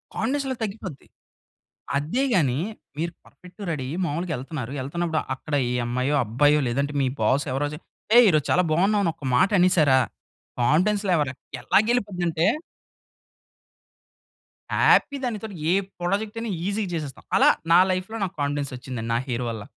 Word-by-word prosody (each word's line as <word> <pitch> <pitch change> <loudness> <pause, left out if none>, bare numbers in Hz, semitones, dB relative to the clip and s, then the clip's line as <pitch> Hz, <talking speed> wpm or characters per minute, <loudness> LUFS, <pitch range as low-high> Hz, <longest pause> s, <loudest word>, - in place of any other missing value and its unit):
Confidence 280 +1 -1
level 250 -3 -4
తగ్గిపోద్ది. 195 -8 -6 0.9
అదే 160 - -1
గాని 135 -8 +2 0.4
మీరు 170 +2 -2
పర్ఫెక్ట్‌గా 180 +3 -12
రెడీ 140 -5 -3
అయి 160 - -4
మామూలుగా 165 +2 -2
ఎళ్తున్నారు. 130 -2 -6
ఎళ్తున్నప్పుడు 160 +4 -1 0.2
అక్కడ 145 +3 -4 0.2
ఏ - - -1
అమ్మాయో, 125 +4 0
అబ్బాయో 145 +7 +3
లేదంటే 140 +4 -1
మీ 135 - +2
బాస్ 140 +3 +2
ఎవరోజి, 145 +2 -2 0.4
"ఏ - - +9
ఈ - - +7
రోజు 150 -2 +1
చాలా 180 - +4
బావున్నావ్" 200 +6 +3
అని 165 - +2
ఒక 145 - -10
మాట 190 - +4
అనేసారా 155 -7 +4 0.6
కాన్ఫిడెన్స్‌లేవల్ 175 - +2 0.3
ఎలా - - +4
గెలిపోద్ది 205 -7 0
అంటే 165 +1 +1 2.2
హ్యాపీ 285 - +4
దానితోటి 220 -4 -4 0.2
ఏ - - +4 0.3
ప్రాజెక్ట్ 205 +5 -1
అయినా 230 -2 -3 0.2
ఈజీ‌గా 205 -1 -2
చేసేస్తాం. 150 -4 -6
అలా - - +6 0.2
నా 175 - +8
లైఫ్‌లో 185 +5 -3
నాకు 190 - -8
కాన్ఫిడెన్స్ 145 -1 -2
వచ్చిందండి 120 -3 -5
నా - - +2
హెయిర్ 125 0 -2
వల్ల. 110 -2 -6
160 Hz, 150 wpm, -24 LUFS, 140-195 Hz, 2.2 s, ఏ